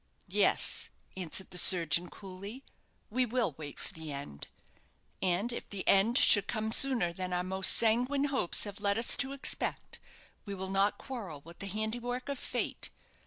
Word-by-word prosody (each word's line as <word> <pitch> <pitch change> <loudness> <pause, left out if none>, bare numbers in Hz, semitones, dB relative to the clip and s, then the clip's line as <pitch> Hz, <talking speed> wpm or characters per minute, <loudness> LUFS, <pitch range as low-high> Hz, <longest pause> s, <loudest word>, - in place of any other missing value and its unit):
"Yes," - - +1 0.3
answered 185 +1 -4
the 180 - +4
surgeon, 170 -1 +5
coolly, 200 +6 -10 0.5
"we 255 +3 +1
will 240 - -1
wait 145 -2 -8
for - - -8
the 160 -2 -8
end; 140 - -8 0.7
and 190 +6 -1
if - - -8
the 200 -2 -6
end 210 +6 +3
should 200 -2 +5
come 220 -1 -3
sooner 235 -9 +4
than 185 +1 -5
our 180 0 -1
most 190 +1 +6
sanguine 250 +5 +1
hopes 275 -11 +2
have 205 -1 -7
led 200 0 0
us 230 - +4
to 270 0 -1
expect, 275 -1 -4 0.4
we 200 -1 -7
will 190 0 -6
not 195 +1 +1
quarrel 200 - -8
with 170 +3 -15
the 200 - -6
handiwork 240 +6 -4
of 280 -2 -4
fate. - - -4
200 Hz, 165 wpm, -30 LUFS, 180-240 Hz, 0.7 s, most